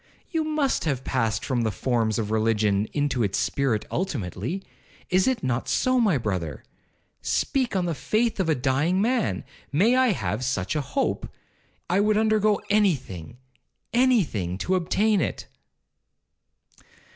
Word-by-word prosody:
You 325 -3 0
must 305 - 0
have 135 -5 -1
passed 115 -5 -1
from 125 -3 0
the 115 - +1
forms 115 -1 0
of 110 -2 -2
religion 110 -2 +2
into 145 -4 0
its 100 -3 0
spirit 130 -6 0
ultimately?—is 175 - -3
it 260 -3 0
not 125 -1 -1
so, 255 -1 +2
my 205 - +3
brother? 90 - -3 0.6
Speak 260 -6 0
on 185 -2 +1
the 170 - -1
faith 220 - 0
of 180 -4 +1
a 155 - +3
dying 140 +8 +1
man. 235 +1 0 0.3
May 205 - +4
I 260 0 +4
have 110 - -1
such 120 -3 -1
a 150 - +1
hope! 140 0 -2 0.6
I 180 +3 +2
would 210 +1 +3
undergo 215 -1 +3
any 205 -4 +4
thing—any 130 - -2
thing, 95 - -4
to 180 - -1
obtain 195 +3 +2
it.' - - -3
145 Hz, 145 wpm, -25 LUFS, -, 0.6 s, May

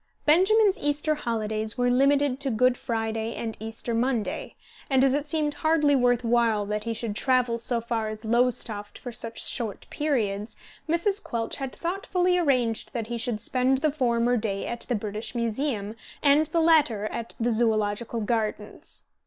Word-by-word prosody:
Benjamin's 385 +6 +4
Easter 295 +1 0
holidays 220 -5 -2
were 245 0 +2
limited 275 +1 +3
to 280 -1 -1
Good 250 +2 +3
Friday 225 -1 -3
and 225 -2 -4
Easter 225 +2 -5
Monday, 235 -1 -1 0.3
and, 265 -1 +4
as 270 -1 +4
it 290 +1 -1
seemed 300 -1 0
hardly 300 -1 +2
worth 245 -1 +2
while 230 -3 +2
that 210 +1 -3
he 230 - -1
should 220 -2 -4
travel 250 -1 +2
so 235 +1 0
far 230 -1 -2
as 215 +1 -6
Lowestoft 225 -3 0
for 245 - -7
such 230 0 -2
short 225 -6 -4
periods, 220 -8 -1 0.3
Mrs. 385 +5 +1
Quelch 230 -1 -3
had 270 -2 -5
thoughtfully 360 0 0
arranged 250 -8 0
that 230 -3 -2
he 240 - -2
should 225 -2 -2
spend 255 +4 +2
the 300 +2 +1
former 245 -3 +1
day 205 -3 -2
at 235 0 -5
the 245 - +1
British 215 +2 -5
Museum 230 -2 -2 0.3
and 295 +2 +5
the 335 - +1
latter 295 -11 +3
at 230 0 -5
the 240 +1 +1
Zoological 220 0 +1
Gardens. 215 -1 -3
240 Hz, 165 wpm, -26 LUFS, 220-280 Hz, 0.3 s, and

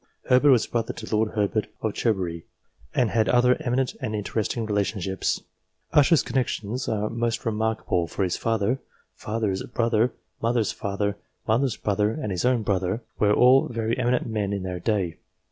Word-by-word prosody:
Herbert 130 +3 +6
was 125 -5 +5
brother 115 -1 -2
to 110 -1 -4
Lord 110 0 +1
Herbert 105 0 0 0.2
of 110 -2 0
Cherbury, 90 -7 -1 0.5
and 120 -5 +2
had 110 -2 +2
other 125 +1 +5
eminent 125 +1 0
and 110 - -2
interesting 110 +3 -2
relationships. 100 -2 -1 0.5
Usher's 150 +2 +5
con 130 +1 +1
nexions 120 +3 -4
are 105 -1 0
most 115 +1 -2
remarkable, 110 -5 0
for 95 - -2
his 90 -2 0
father, 115 +3 0 0.3
father's 105 -3 -2
brother, 115 0 +1 0.3
mother's 115 -1 +1
father, 100 0 -2 0.3
mother's 120 +2 +1
brother, 105 +1 0
and 115 -8 -4
his 90 +4 -1
own 125 -3 +2
brother, 95 +3 -1 0.2
were 105 -1 +4
all 125 +5 +5
very 115 -1 -1
eminent 125 0 +1
men 105 -3 -2
in 100 -2 -3
their 90 -1 -4
day. 95 -3 -1
110 Hz, 160 wpm, -25 LUFS, 100-120 Hz, 0.5 s, Herbert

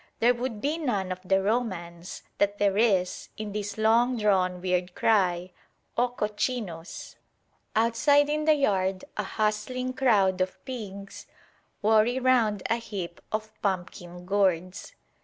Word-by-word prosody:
there 240 +2 +4
would 240 -2 -4
be 305 +4 -1
none 205 - -1
of 185 - -4
the 190 +1 +2
romance 185 -6 -3 0.2
that 200 0 +2
there 200 -1 +2
is 200 -5 +1
in 215 -1 -5
this 205 0 -4
long 235 +3 +3
drawn 185 -4 +2
weird 180 0 -1
cry 185 -4 +2 0.4
"O 245 +1 +2
Cochinos!" 210 -6 -4 0.6
Outside 235 +6 +4
in 305 +1 -1
the 310 -1 +5
yard 190 -8 0
a - - -1
hustling 250 +5 -2
crowd 200 -8 +3
of 185 0 -1
pigs 200 -6 -7 0.6
worry 220 +3 +4
round 235 -6 +2
a 230 - +1
heap 195 -7 -6
of 215 0 -3
pumpkin 180 -2 -4
gourds. 190 - 0
210 Hz, 135 wpm, -27 LUFS, 185-240 Hz, 0.6 s, the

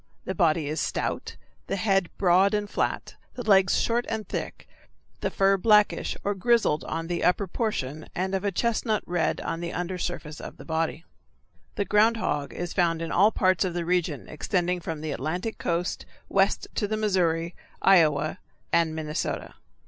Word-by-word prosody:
The 190 - -2
body 165 -5 +2
is 155 +2 -2
stout, - - -2 0.3
the 195 - -1
head 195 -2 +1
broad 190 +3 +4
and 210 0 -1
flat, - - -2 0.2
the 245 - -5
legs 195 -3 +4
short 235 +1 0
and 220 -3 -3
thick, - - -5 0.5
the - - -1
fur 195 0 +3
blackish 210 +1 +3
or 205 - 0
grizzled 210 -6 +2
on 165 +1 -3
the 170 0 -2
upper 180 +3 +3
portion 155 - -3
and 190 +2 -1
of 190 0 -1
a 200 - 0
chestnut 220 +1 0
red 170 -3 0
on 165 - -3
the 170 0 -4
under 180 +1 -3
surface 160 -4 -4
of - - -9
the - - -11
body. 160 0 -2 0.7
The 205 - -1
ground 220 +3 +4
hog 145 -9 -2
is 175 0 -5
found 170 -3 +2
in 165 0 -4
all 200 +5 +5
parts 185 -3 +2
of 180 -2 -2
the 175 -1 -2
region 170 -6 -1
extending 180 +3 -1
from 160 -3 -5
the 155 -1 -3
Atlantic 175 - -3
coast 175 +1 -2 0.2
west - - +2
to 210 - -1
the 215 +1 -1
Missouri, 175 -5 +1 0.3
Iowa, 155 -5 +4 0.3
and 165 -2 +3
Minnesota. 155 -1 -3
180 Hz, 175 wpm, -26 LUFS, 165-200 Hz, 0.7 s, all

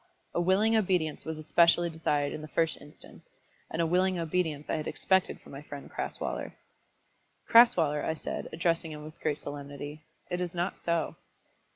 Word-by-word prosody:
A 175 - +1
willing 200 +6 +3
obedience 180 -8 +1
was 160 -1 -4
especially 170 +2 +4
desired 150 -3 0
in - - -5
the 155 - -7
first 165 +1 0
instance, 145 +1 -14 0.4
and 165 +1 0
a - - +2
willing 185 +2 +2
obedience 160 -3 -1
I - - -1
had 155 - -4
expected 190 -1 +1
from - - -15
my 140 - -7
friend 145 -1 -9
Crasweller. - - -3 0.9
"Crasweller," 165 -11 +6
I 160 - 0
said, - - -5
addressing 165 -1 0
him 150 0 -8
with 155 +1 -11
great 150 -2 0
solemnity; 145 +1 -7 0.3
"it 180 0 -1
is 180 -1 -3
not 175 +2 -2
so." 170 -2 -1
160 Hz, 170 wpm, -30 LUFS, 150-175 Hz, 0.9 s, Crasweller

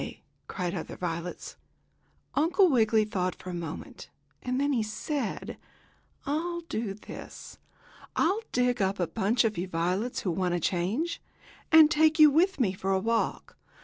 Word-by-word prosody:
cried 180 -2 -3
other 175 - -5
violets. 170 0 -5 0.8
Uncle 355 +6 +4
Wiggily 220 -3 +3
thought 185 -3 -2
for 185 - -8
a - - -6
minute, 170 -1 -7 0.3
and 255 0 -2
then 285 +1 +1
he 240 - +1
said: 220 +4 -4 0.7
"I'll 340 +4 -2
do 225 -11 -4
this. 210 - -10 0.6
I'll 385 +7 +2
dig 245 -2 +1
up 195 +1 0
a 175 - +2
bunch 220 +6 +1
of 215 -5 0
you 180 - -2
violets, 185 +7 -1
who 185 - -1
want 180 0 0
a - - 0
change, 200 - -1 0.5
and 320 -1 +8
take 315 0 +4
you 305 -2 +8
with 350 +4 +2
me 205 -7 +2
for 190 +1 -3
a 190 - +3
walk. 230 +3 -1
220 Hz, 155 wpm, -28 LUFS, 185-295 Hz, 0.8 s, and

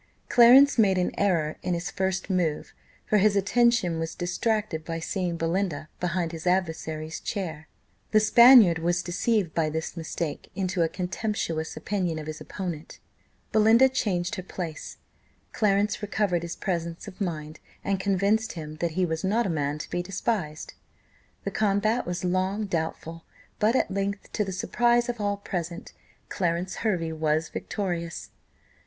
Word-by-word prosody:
Clarence 250 +3 +7
made 195 -4 +4
an 180 - +1
error 170 -6 +1
in 180 - -1
his 180 +3 -4
first 190 -1 -1
move, 175 -6 -1 0.3
for 210 - +3
his 205 +1 +4
attention 205 -4 +2
was 165 0 -4
distracted 180 -1 -1
by 165 +1 -4
seeing 175 0 -2
Belinda 165 -2 -1
behind 175 -1 -1
his 165 +1 -6
adversary's 160 -3 -1
chair. 160 -6 -4 0.4
The 215 - +5
Spaniard 215 -5 +7
was 175 +2 0
deceived 185 0 0
by 160 -2 +1
this 160 +2 -4
mistake 160 -2 -4
into 185 -2 -1
a 165 - +2
contemptuous 180 -4 -3
opinion 175 0 -2
of 155 - -6
his 155 0 -7
opponent 175 -5 -6 0.5
Belinda 225 +4 +6
changed 190 -8 -1
her - - -3
place 175 -3 -6 0.6
Clarence 205 -1 +1
recovered 205 -4 0
his 170 0 -5
presence 170 0 -3
of 205 +1 -10
mind, 155 -4 -4 0.2
and 195 -1 0
convinced 200 +3 +1
him 155 -2 -7
that 170 0 -2
he 185 - +3
was 160 -1 -3
not 215 +5 +1
a - - -1
man 145 -2 -1
to 150 - -7
be 175 - -1
despised. 185 -4 -3 0.7
The - - -3
combat 215 +2 +1
was 175 0 -3
long 185 +4 0
doubtful, 165 -2 -4 0.4
but 220 +4 +3
at 260 - +1
length 200 +1 -3
to 210 - +1
the 195 - -4
surprise 240 +5 +1
of 240 -3 -3
all 205 0 0
present, 175 -4 -5 0.3
Clarence 175 0 -2
Hervey 175 -7 -1
was 155 0 0
victorious. 175 -5 -4
180 Hz, 155 wpm, -26 LUFS, 165-205 Hz, 0.7 s, Clarence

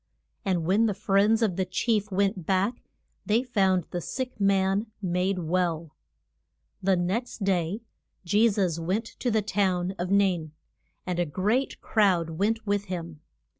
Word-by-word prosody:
And 180 -5 0
when 205 +6 +3
the 205 - -1
friends 205 +3 +3
of 190 -5 0
the 190 - +2
chief 210 +2 0
went 195 -2 0
back 195 +5 +1 0.4
they 220 +4 +2
found 190 -8 +2
the 175 - -3
sick 255 +5 -5
man 195 +2 +2
made 185 0 0
well. 170 -2 -1 0.9
The 190 0 +3
next 195 +6 -2
day 190 +2 0 0.4
Je 210 +6 +4
sus 185 -6 0
went 190 +7 -1
to 245 - -4
the 220 -2 +1
town 185 -2 0
of 180 +1 -2
Nain. 185 -6 +2 0.5
And 180 -1 -2
a 175 - +2
great 210 - 0
crowd 185 -7 +2
went 215 +7 -1
with 205 -1 0
him. 170 -5 -6
195 Hz, 150 wpm, -27 LUFS, 180-210 Hz, 0.9 s, Je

